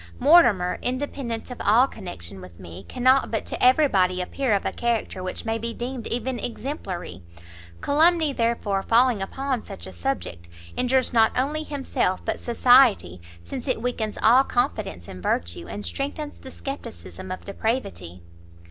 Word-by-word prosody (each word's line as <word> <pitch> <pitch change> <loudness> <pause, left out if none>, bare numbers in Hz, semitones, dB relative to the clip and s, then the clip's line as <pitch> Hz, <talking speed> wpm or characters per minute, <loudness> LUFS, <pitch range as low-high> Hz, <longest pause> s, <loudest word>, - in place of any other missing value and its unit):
Mortimer, 245 - +5
independent 255 -2 -3
of 250 - -7
all 230 +5 +5
connection 95 - -8
with 90 -2 -13
me, 90 0 -10
cannot 255 +1 +3
but 225 - -2
to - - -4
every 260 +4 +6
body 185 -5 +2
appear 250 +8 -2
of 200 - -2
a - - 0
character 235 -5 -2
which 185 +4 -5
may 225 0 -1
be 230 +1 -4
deemed 245 -1 -5
even 245 +1 -2
exemplary; 195 - -5 0.6
calumny, 315 0 +3
therefore, 230 -5 0
falling 235 0 +3
upon 260 +4 -3
such 85 - -9
a 95 - -9
subject, 85 -3 -4 0.3
injures 255 0 +1
not 225 -1 +5
only 290 +4 0
himself 275 -11 -1
but 220 - -2
society, 235 - +4 0.2
since 255 - -7
it 255 - 0
weakens 225 -4 -2
all 250 +4 +7
confidence 215 - -2
in 90 - -9
virtue, 85 0 -2
and 205 - -4
strengthens 290 +2 -4
the 265 - -10
scepticism 135 - -8
of 185 - -6
depravity." 95 - -3
230 Hz, 155 wpm, -24 LUFS, 180-260 Hz, 0.6 s, all